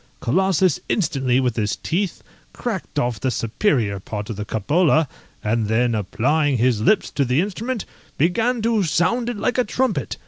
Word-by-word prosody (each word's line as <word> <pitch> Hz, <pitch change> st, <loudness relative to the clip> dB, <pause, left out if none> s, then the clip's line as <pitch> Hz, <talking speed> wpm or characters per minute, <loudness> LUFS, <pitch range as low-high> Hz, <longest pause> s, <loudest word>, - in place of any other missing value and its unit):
Colossus 185 Hz, +3 st, +2 dB
instantly, 135 Hz, -, +1 dB
with 125 Hz, -3 st, 0 dB
his 105 Hz, -2 st, 0 dB
teeth, 185 Hz, +3 st, -2 dB, 0.3 s
cracked 220 Hz, -10 st, -5 dB
off 120 Hz, -5 st, 0 dB
the 130 Hz, -, 0 dB
superior 115 Hz, -, 0 dB
part 105 Hz, +2 st, -5 dB
of -, -, -4 dB
the 105 Hz, +1 st, -5 dB
cupola, 155 Hz, -, +2 dB, 0.4 s
and 110 Hz, 0 st, 0 dB
then 120 Hz, +2 st, +2 dB
applying 135 Hz, +8 st, +1 dB
his 120 Hz, -2 st, +2 dB
lips 205 Hz, -, +2 dB
to 140 Hz, -, +1 dB
the 125 Hz, +2 st, +1 dB
instrument, 210 Hz, +5 st, -2 dB, 0.3 s
began 225 Hz, -, +1 dB
to 225 Hz, -2 st, +2 dB
sound 215 Hz, +8 st, +1 dB
it 240 Hz, -, -4 dB
like 245 Hz, +5 st, 0 dB
a -, -, +4 dB
trumpet. 210 Hz, -, -1 dB
145 Hz, 165 wpm, -21 LUFS, -, 0.4 s, a